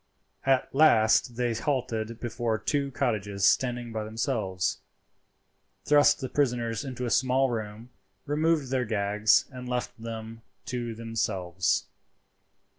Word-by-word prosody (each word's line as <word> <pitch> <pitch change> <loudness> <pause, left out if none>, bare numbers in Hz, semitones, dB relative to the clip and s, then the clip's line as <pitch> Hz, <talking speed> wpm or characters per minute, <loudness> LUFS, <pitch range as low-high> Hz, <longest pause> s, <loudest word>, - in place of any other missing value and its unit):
At 135 -1 +2
last 120 -5 +4
they 120 -1 0
halted 115 -3 -2
before 120 -2 -2
two 140 +4 -1
cottages 105 -7 -1
standing 120 -2 +1
by 110 -1 -3
themselves, 110 -4 -2 1.1
thrust 145 0 +5
the 130 - -2
prisoners 120 -4 0
into 125 -2 -5
a 120 - -2
small 130 +1 +2
room, 110 +1 -5 0.3
removed 150 -2 +1
their 130 -2 +1
gags, 105 -1 +2
and 125 -1 -8
left 125 -1 -2
them 115 0 -7 0.2
to 120 -2 -4
themselves. 100 -6 -1
120 Hz, 115 wpm, -27 LUFS, 110-130 Hz, 1.1 s, thrust